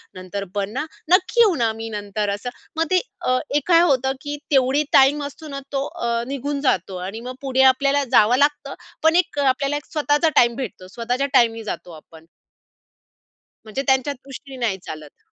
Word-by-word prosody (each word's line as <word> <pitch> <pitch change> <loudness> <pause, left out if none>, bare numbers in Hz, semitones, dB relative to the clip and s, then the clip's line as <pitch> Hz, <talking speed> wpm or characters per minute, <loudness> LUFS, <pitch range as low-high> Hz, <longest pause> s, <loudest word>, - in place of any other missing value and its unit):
नंतर 185 +2 -6
पण 200 -1 -1
ना 285 - -2 0.3
नक्की 380 +6 +4
येऊ 415 -7 +5
ना 230 -4 +1
मी 225 0 -6
नंतर." 205 0 -3
असं 205 +5 -5 0.3
मग 325 - +2
ते 370 - +5 0.6
एक 295 - -1
काय 340 -1 +6
होतं 265 -5 +2
की 290 0 -5
तेवढी 270 +1 +3
टाईम 280 +2 +5
असतो 285 +2 -8
ना 280 -2 -5
तो 275 -1 -1
अ, 235 0 -2
निघून 280 +1 -3
जातो 190 - 0
आणि 200 +4 -6
मग 250 +1 -7
पुढे 265 -1 +1
आपल्याला 280 +1 +1
जावं 240 +1 +5
लागतं 290 +1 +1 0.3
पण 320 +1 +4
एक 355 -4 +1
अ, 285 - +2
आपल्याला 275 +2 +1
एक 295 - -9
स्वतःचा 300 +1 +2
टाईम 235 -1 +4
भेटतो 220 -8 -6
स्वतःच्या 245 +6 -2
टाईमनी 230 -3 +3
जातो 180 -4 -6
आपण. 160 0 -15 1.4
म्हणजे 220 +5 -3
त्यांच्या 265 +2 +2
दृष्टीने 270 0 -11
नाही 195 -4 -1
चालत. 155 -2 -10
265 Hz, 180 wpm, -21 LUFS, 225-290 Hz, 1.4 s, काय